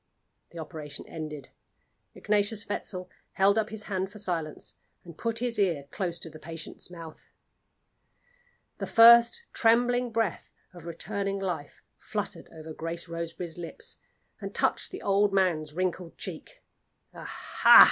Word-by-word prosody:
The 170 - -12
operation 155 -2 -7
ended. 150 -4 -6 0.7
Ignatius 210 0 +1
Wetzel 185 -2 -4 0.3
held 195 +1 +4
up 220 - -1
his 220 -1 -4
hand 190 -2 -2
for 210 - -11
silence 170 -6 -3 0.3
and 170 -3 -11
put 230 +5 -2
his 240 -2 0
ear 170 -8 +2
close 175 -3 -2
to 165 - -5
the 155 - -11
patient's 165 +1 -7
mouth. 165 -3 -11 1.5
The - - -3
first 235 - +8
trembling 245 +1 +3
breath 225 -5 -1 0.2
of 175 -2 -11
returning 195 +3 -2
life 175 -7 -4 0.2
fluttered - - -4
over 160 -1 -8
Grace 165 +2 -4
Roseberry's 170 0 -4
lips 170 - -6 0.4
and - - -6
touched - - +1
the 375 - -8
old 200 0 +3
man's 160 -6 +1
wrinkled 180 -1 -2
cheek. - - -7 0.5
"Aha!" - - +5
185 Hz, 135 wpm, -29 LUFS, 165-210 Hz, 1.5 s, first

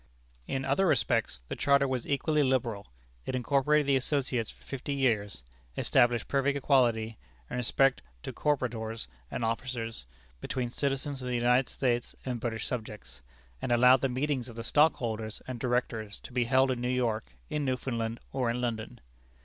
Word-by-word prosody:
In 135 0 -2
other 140 +8 +2
respects 85 - +1
the - - -4
charter 140 -1 +3
was 130 -2 -2
equally 150 +2 +1
liberal. 120 -7 0 0.4
It 130 - -1
incorporated 140 +4 +2
the 140 0 +3
associates 130 -4 -1
for - - -15
fifty 140 +1 -4
years, 105 - 0 0.3
established 120 -3 +3
perfect 140 0 +1
equality, 120 -5 +2 0.3
in - - -2
respect 135 +2 +2 0.2
to - - -5
corporators 115 -6 -1 0.2
and 115 - -2
officers, 115 - -3 0.3
between 125 - -3
citizens 140 0 -2
of 125 - -5
the 125 - -1
United 125 +2 +3
States 120 -2 -1
and 125 -2 -2
British 115 -1 -3
subjects, 105 - -6 0.4
and - - -2
allowed 125 +2 +6
the 135 - +1
meetings 130 -1 -1
of 115 - -10
the 115 - -5
stockholders 115 -7 +1
and 130 -2 -5
directors 120 -4 -1
to - - -11
be 125 -1 +2
held 130 +2 +4
in 125 -2 -2
New 125 - 0
York, 115 - -1 0.2
in 150 - 0
Newfoundland, 120 -3 -2
or 125 -3 0
in 120 +1 -1
London. 115 -3 -3
125 Hz, 165 wpm, -30 LUFS, 115-135 Hz, 0.4 s, allowed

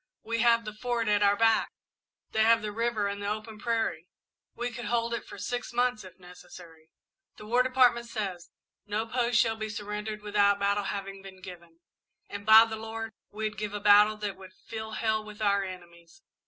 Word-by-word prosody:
We 230 0 -2
have 230 -1 +4
the 215 - -6
Fort 235 +1 -2
at 205 0 +3
our 200 0 +4
backs 225 0 +3 0.6
they 220 - +1
have 225 0 +4
the 210 - -3
river 225 -1 -1
and 200 0 -4
the 200 - -2
open 215 0 -5
prairie. 225 -8 -1 0.5
We 245 +1 -3
could 240 +1 -7
hold 235 0 0
it 235 - -4
for - - -10
six 245 +5 -4
months, 245 -1 +1
if 185 -1 -13
necessary. 175 -3 -14 0.5
The - - -11
War 240 +3 +3
Department 250 -2 +3
says: 190 -7 -5 0.4
'No 210 +2 -1
post 240 0 0
shall 225 -1 +2
be 215 0 -4
surrendered 210 0 -5
without 205 -1 +3
battle 200 0 0
having 195 0 -5
been 190 -1 -12
given,' 170 -2 -12 0.5
and, 205 0 -8
by 220 +1 +9
the 220 -1 -5
Lord, 225 0 -6 0.2
we'd 215 0 -4
give 210 -1 -4
a - - -2
battle 210 +1 +6
that 205 -2 -4
would 190 -1 -13
fill 220 +1 -8
hell 220 -1 0
with 210 0 -11
our 200 -2 +2
enemies. 175 - -11
215 Hz, 195 wpm, -28 LUFS, 200-230 Hz, 0.6 s, by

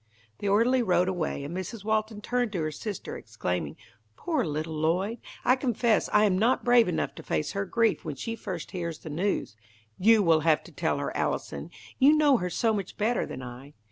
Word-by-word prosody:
The 205 - -1
orderly 235 +6 +4
rode 180 -5 +2
away, 170 -6 -2
and 150 +5 -6
Mrs. 190 +3 -5
Walton 215 -1 -1
turned 245 0 -1
to 180 - -1
her 155 - -2
sister, 200 +6 -6
exclaiming, 90 -9 -4 0.4
"Poor 315 -6 0
little 155 0 -3
Lloyd! 180 +9 0 0.3
I 250 - +5
confess 240 -4 +1
I 210 - +5
am 185 -3 +2
not 240 +5 +2
brave 240 -3 +6
enough 180 - -1
to - - -10
face 80 -1 -2
her 200 0 -2
grief 225 +2 +1
when 155 -5 -4
she 225 - -4
first 190 -7 -6
hears 170 -3 -4
the 155 - -9
news. 170 - -1 0.4
You 220 +2 +5
will 165 -3 +4
have 155 -1 +2
to - - -14
tell - - -1
her, - - -3
Allison. - - -2 0.3
You 280 +3 +7
know 295 -4 +5
her 180 -3 -2
so 225 +5 +1
much 200 -3 -4
better 220 +3 0
than 130 - -7
I. 125 +4 -10
195 Hz, 205 wpm, -27 LUFS, 160-230 Hz, 0.4 s, You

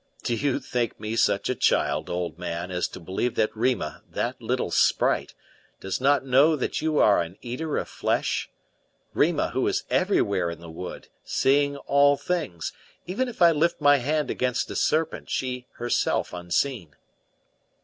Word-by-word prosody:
"Do 120 - 0
you 140 +2 0
think 120 -2 -2
me 110 +1 -4
such 100 -3 +2
a - - +1
child, - - +1
old 90 -2 -3
man, 85 0 -4
as 90 0 0
to - - -10
believe 95 +8 -2
that 110 0 0
Rima, 110 - -1
that - - -3
little - - -1
sprite, - - +2 0.4
does 95 +5 -3
not 140 +1 +3
know 140 +5 +5
that 135 - -2
you 155 -1 0
are 105 -4 +5
an 85 +3 -6
eater 145 +6 -3
of - - -2
flesh? - - -1 0.6
Rima, - - +2
who - - 0
is - - 0
everywhere 95 -4 +2
in 85 - -7
the 85 -1 -10
wood, 90 +3 -8 0.2
seeing 140 +1 +2
all 140 +1 +3
things, 155 - -3 0.3
even 205 +9 -1
if 230 -7 -1
I 170 - +8
lift 165 +2 +1
my 145 -1 +6
hand 150 +2 -1
against 125 -1 -1
a - - -5
serpent, 160 +1 0
she 125 -1 -3
herself 120 -5 0
unseen." 90 - -2
125 Hz, 165 wpm, -25 LUFS, 90-145 Hz, 0.6 s, I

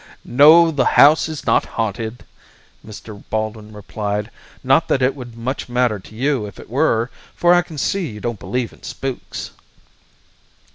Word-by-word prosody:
"No, 160 +6 +6
the 140 -4 +1
house 155 +3 +6
is 155 -2 -7
not - - +3
haunted," 110 +1 -3 0.6
Mr. 105 -1 -11
Baldwin 110 0 -3
replied. 105 0 -4 0.3
"Not 135 +5 +3
that 135 - +1
it 130 +1 +2
would 120 -4 -10
much 130 +3 -4
matter 120 -4 +1
to 110 - -15
you 130 -3 0
if 100 - -12
it - - -13
were, 125 -3 +1 0.2
for 175 0 +4
I 175 - +5
can 170 -3 -11
see 185 +5 -1
you 105 - -9
don't 115 -2 -4
believe 125 -2 -3
in - - -20
spooks." 135 -2 -6
125 Hz, 160 wpm, -19 LUFS, 110-140 Hz, 0.6 s, No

